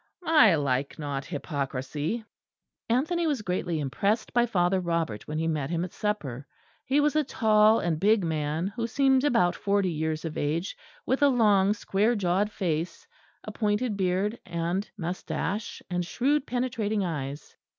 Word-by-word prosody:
I 245 - +6
like 140 -2 -1
not 140 -2 -4
hypocrisy." 145 - -3 0.6
Anthony 320 +8 +1
was 280 -8 -1
greatly 180 -3 -1
impressed 200 - -1
by 240 0 +3
Father 185 -3 +2
Robert 165 - -2
when 150 - -3
he 160 +1 0
met 150 -4 -1
him 170 +1 -1
at 180 - -10
supper. 145 - -3 0.4
He 275 +2 +2
was 295 +1 +2
a 305 - +3
tall 220 -4 +4
and 165 -2 -1
big 210 +2 +3
man, 155 0 -1
who 230 -1 -2
seemed 265 +2 +3
about 230 -11 +3
forty 200 -2 +1
years 160 0 -2
of 160 - -4
age, 160 +6 -1 0.3
with 260 +3 0
a 285 - +7
long 210 -5 +4
square 210 +3 +1
jawed 200 +1 +1
face, 170 -3 -3 0.4
a - - -6
pointed 210 +1 0
beard 195 +3 0
and 175 +3 -2
moustache, 185 +3 -4
and 180 -1 -1
shrewd 270 +10 0
penetrating 225 -5 -1
eyes. 145 -3 -5
190 Hz, 155 wpm, -27 LUFS, 160-225 Hz, 0.6 s, a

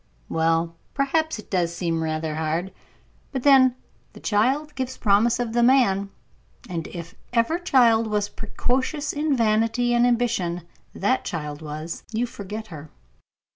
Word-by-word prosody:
"Well, 165 +1 +1 0.2
perhaps 315 +3 +1
it 215 - -12
does 170 -3 0
seem 165 -2 -1
rather 155 0 -2
hard; 160 +4 -2 0.6
but 265 -3 -3
then, 265 -3 +6 0.4
'the - - -12
child 265 +8 +1
gives 260 -2 -4
promise 225 +3 +3
of 235 -2 -2
the 240 - +3
man,' 235 -6 +4 0.6
and 170 -3 -4
if 170 -2 -8 0.2
ever 240 +9 +2
child 235 -9 +4
was 210 -1 0
precocious 260 +8 -2
in 295 -2 0
vanity 230 +2 +2
and 240 +1 +4
ambition, 225 -8 0 0.3
that 230 +7 +1
child 150 -2 -5
was. 155 +2 -6
You 230 +2 0
forget 215 -1 -7
her." 155 -2 -9
220 Hz, 140 wpm, -24 LUFS, 170-250 Hz, 0.6 s, then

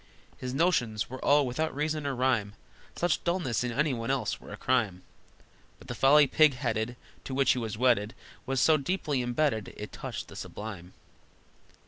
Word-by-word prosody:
His 125 - -5
notions 125 -8 +1
were 130 - -7
all 145 0 +4
without 145 +5 -2
reason 150 0 -1
or 140 - -1
rhyme, 120 -5 +1 0.4
Such 175 -2 0
dullness 170 -10 0
in 125 - -2
any 145 +3 +1
one 115 0 -4
else 130 -5 -1
were - - -11
a - - -7
crime, 110 -8 0 0.7
But - - -16
the - - -2
folly 145 +2 +6
pig 150 +1 +4
headed 120 -1 -2 0.3
To 130 - -4
which 135 0 +4
he 125 - +1
was 110 -2 -4
wedded 115 -3 +2 0.3
Was 135 0 0
so 155 +3 +5
deep 165 +7 -3
imbedded, 125 -4 0
it - - -7
touched - - -6
the - - -12
sublime! 100 -5 -8
130 Hz, 175 wpm, -29 LUFS, 115-150 Hz, 0.7 s, folly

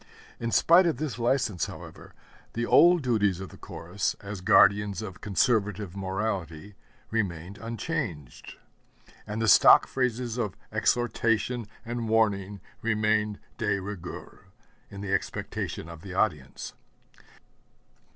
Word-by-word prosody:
In 115 - -2
spite 165 - +5
of 160 - 0
this 135 -6 -4
license, 120 - 0
however, - - -11 0.4
the 120 +1 -1
old 175 +4 +6
duties 105 -7 +1
of 95 -2 -7
the - - -13
Chorus 85 +4 -3
as 100 -1 -7
guardians 100 0 +4
of 95 - -8
conservative 105 -2 0
morality 95 -2 -3 0.4
remained 95 -4 -3
unchanged; 115 - -5 0.7
and 105 +1 -4
the 115 - 0
stock 95 - +8
phrases 125 -2 -2
of 105 -5 -2
exhortation 120 -1 0 0.2
and 120 -1 -3
warning 100 -3 +1 0.2
remained 105 -1 +1 0.2
de 105 -3 0
rigueur 95 -1 -8 0.4
in 100 - -9
the 100 -1 -3
expectation 90 -3 -3
of 85 -2 -10
the 95 0 -8
audience. 75 -10 -2
105 Hz, 120 wpm, -27 LUFS, 95-115 Hz, 0.7 s, stock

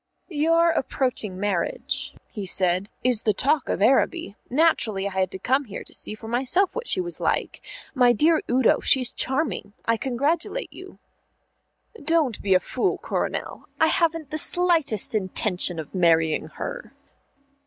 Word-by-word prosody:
"Your 330 +1 +3
approaching 245 - -2
marriage," 195 -4 -2 0.2
he 210 - -5
said, 185 +1 +1
"is 245 -3 +2
the 215 -3 +1
talk 285 +3 +1
of - - 0
Araby. 270 - +2
Naturally 235 -9 +2
I - - -5
had 190 -1 0
to 190 - -7
come 265 +8 +1
here 210 - -7
to - - -17
see 215 - -6
for 220 +1 -11
myself 265 - +1
what 485 0 -4
she - - +1
was 350 -1 -4
like. - - -1 0.3
My 250 -3 +5
dear 310 +7 +3
Udo, 250 -1 +3
she's 255 -2 +2
charming; 265 -6 -2
I 230 0 +2
congratulate 285 - -2
you." - - -12 1.1
"Don't 305 -6 +1
be 195 -2 +3
a - - +6
fool, 260 - -1
Coronel. - - -4
I 320 - +4
haven't 330 -3 0
the 310 - +2
slightest 330 - +1
intention 185 -3 0
of 160 -2 -7
marrying 165 -3 +2
her." - - -7
250 Hz, 155 wpm, -24 LUFS, 200-320 Hz, 1.1 s, a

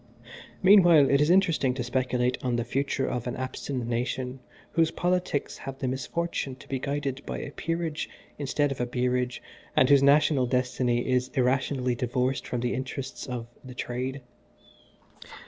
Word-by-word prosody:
"Meanwhile 175 -8 +7
it 140 +1 +4
is 150 - +3
interesting 165 -8 +3
to 125 - -2
speculate 125 0 0
on 125 -2 0
the 120 - 0
future 135 +2 -1
of 125 -1 -3
an 125 - -3
abstinent 130 -1 -4
nation 125 +2 -2 0.3
whose 165 -1 +3
politics 180 -5 -1
have 135 0 -7
the 135 - -2
misfortune 135 +2 -2
to 130 - -16
be 135 - -2
guided 140 -1 -3
by - - -3
a 145 - -6
Peerage 165 0 -3 0.3
instead 145 0 0
of 130 - -3
a 125 - 0
Beerage, 125 0 -1 0.3
and 130 - +5
whose 140 -1 +7
national 140 -2 +4
destiny 125 -1 0
is 125 0 +1
irrationally 130 0 +1
divorced 125 +2 -1
from 120 - -2
the 125 0 0
interests 130 +1 -5
of 125 -2 -4 0.2
'The 130 -1 -10
Trade.' 130 +3 -3
130 Hz, 160 wpm, -27 LUFS, 125-145 Hz, 0.3 s, Meanwhile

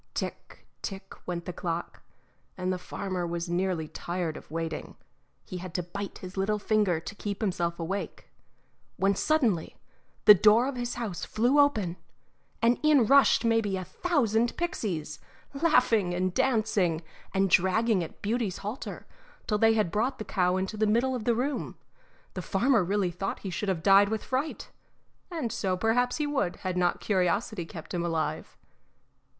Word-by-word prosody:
Tick, - - -6 0.2
tick, 195 -1 -6
went 175 -1 -3
the 180 - -5
clock, 170 -1 -4 0.6
and 185 0 -1
the 180 - -4
farmer 180 -1 -4
was 170 0 -3
nearly 175 -3 0
tired 170 0 -3
of - - -11
waiting; 165 -1 -4 0.5
he 185 - -6
had 180 -1 -8
to 180 - 0
bite 200 +3 -6
his 185 0 -9
little 200 +2 0
finger 205 -5 +1
to 165 - -8
keep 205 -1 -5
himself 175 -5 -1
awake, 185 +5 -4 0.7
when 195 +1 +3
suddenly 235 - +1 0.5
the 210 - +12
door 215 +5 +5
of 275 - -3
his 245 0 -3
house 225 -8 -4
flew 245 +6 +2
open, 210 -12 +2 0.7
and 235 +1 +4
in 300 -6 +5
rushed 275 -1 +5
maybe 225 -4 +2
a 185 - -4
thousand 235 - 0
pixies, 195 - -3 0.3
laughing 250 - +3
and 185 0 0
dancing 210 -10 +1 0.3
and 195 -1 +1
dragging 195 +1 +3
at 165 - -11
Beauty's 215 -2 -1
halter 210 +6 -6 0.4
till 210 -2 0
they 225 0 +5
had 210 -6 +1
brought 240 +6 0
the 215 - -6
cow 180 0 +1
into 190 +3 -3
the 215 0 +2
middle 235 +5 +2
of 240 -4 -4
the 235 - +3
room. 265 +4 -2 0.6
The 185 - -4
farmer 225 +4 +2
really 190 0 0
thought 195 +3 -4
he 195 - -5
should 200 +3 -2
have 170 -4 -1
died 200 0 +6
with 220 0 -2
fright, 270 +4 -3 0.6
and 315 -10 -3
so 185 -2 -1
perhaps 245 +5 +1
he 300 - 0
would 275 -11 -1
had 185 -1 -4
not 180 -1 +1
curiosity 190 0 0
kept 160 -2 -9
him 175 -1 -1
alive. 165 -2 -2
200 Hz, 165 wpm, -28 LUFS, 180-230 Hz, 0.7 s, the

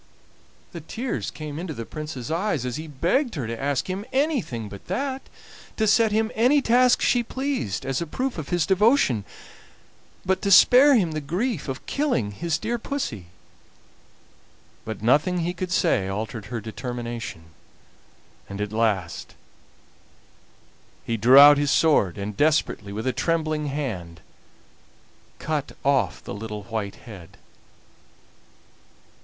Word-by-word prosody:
The 170 - -8
tears 235 - -4
came 150 -1 -7
into 170 -4 -5
the 115 - -6
Prince's 150 -4 -6
eyes 165 - -1
as 125 +2 -3
he 160 +1 -7
begged 175 - 0
her 135 -6 -3
to 115 +2 -5
ask 140 -1 -1
him 190 +2 -3
anything 265 - -1
but 100 -1 -11
that 270 -1 -2 0.6
to 220 - +2
set 220 +1 +4
him 220 +1 +1
any 250 +6 +4
task 250 -1 +3
she 245 - +3
pleased 240 - -3
as 135 +1 -1
a 170 - -3
proof 255 - -3
of 145 - -7
his 175 -3 +1
devotion, 190 - +3 1.0
but 190 +1 0
to 200 - -1
spare 260 +8 +7
him 185 -8 +2
the 155 -1 -3
grief 185 - -2
of 135 0 -6
killing 270 - -1
his 165 +9 -2
dear 235 +2 -3
Pussy. 220 - -4 1.6
But 110 -1 -6
nothing 160 +9 +2
he 175 +2 -2
could 180 0 -5
say 95 - +2
altered 105 +2 -4
her 120 0 -4
determination, 115 -3 -6 1.1
and 100 0 -7
at 105 0 -3
last 105 -7 -1 1.7
he 115 - -1
drew 135 +6 +8
his 145 0 0
sword, 135 - +3
and 100 +1 -5
desperately, 145 -8 +1
with 110 +4 -5
a 130 - 0
trembling 155 +2 -1
hand, 105 - -4 1.2
cut 150 -2 -3
off 135 -10 +1
the - - -7
little 105 0 -6
white 110 -2 -4
head. 95 -8 -12
145 Hz, 140 wpm, -24 LUFS, -, 1.7 s, drew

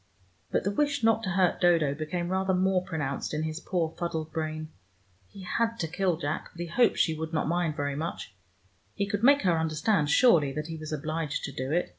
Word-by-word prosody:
But - - 0
the 200 - 0
wish 285 +4 0
not 225 0 +4
to 195 - -3
hurt 185 -1 +2
Dodo 165 -5 +4
became 165 +4 -3
rather 190 0 +1
more 185 0 +2
pronounced 150 -4 -3
in 155 - -1
his 155 +1 -3
poor 170 -3 -1
fuddled 160 -2 -3
brain. 155 -1 -3 0.6
He 195 - -12
had 230 +5 -1
to 165 - -2
kill 180 0 0
Jack, 155 -1 -3
but 170 - -15
he - - -2
hoped 230 +8 +2
she 160 - +2
would 160 +1 -5
not 155 - 0
mind 170 -2 0
very 145 -2 -2
much: 155 - -5 0.6
he 200 - 0
could 205 0 -2
make 280 +1 +6
her 170 -3 +3
understand 160 +1 +1
surely 160 - +5
that 150 +1 -3
he 165 0 -6
was 155 0 -7
obliged 155 0 -3
to 140 - -4
do 130 +1 -4
it. 175 +3 +1
165 Hz, 215 wpm, -28 LUFS, 155-190 Hz, 0.6 s, make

